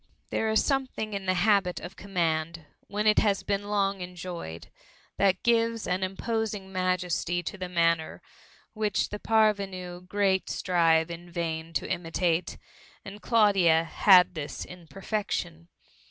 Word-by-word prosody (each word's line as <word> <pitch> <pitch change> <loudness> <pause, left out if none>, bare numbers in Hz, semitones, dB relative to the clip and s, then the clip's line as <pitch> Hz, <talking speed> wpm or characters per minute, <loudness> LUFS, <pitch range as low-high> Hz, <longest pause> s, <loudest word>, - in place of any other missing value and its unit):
There 220 - 0
is 220 0 +2
something 260 -6 -1
in 195 -1 -4
the 185 - +2
habit 195 -1 +2
of 195 - -9
command, 165 -4 -2 0.2
when 210 +1 -2
it 215 -1 +5
has 200 -2 +1
been 200 0 -1
long 200 -2 0
enjoyed, 175 - -7 0.5
that 190 -2 +2
gives 230 -1 +2
an 180 +1 -1
imposing 200 0 -3
majesty 180 -1 -1
to 190 - -5
the 185 -2 -6
manner, 170 -2 0 0.5
which 215 -2 0
the 210 - -6
parvenu 195 -5 0
great 195 -1 +1
strive 165 -2 +2
in 170 +1 -9
vain 165 -1 -4
to 150 - -1
imitate; 175 -1 -1 0.5
and 200 +2 -9
Claudia 195 -8 +4
had 180 +2 +5
this 155 -4 -5
in 180 -2 -12
perfection. 190 -4 -4
185 Hz, 140 wpm, -27 LUFS, 170-205 Hz, 0.5 s, it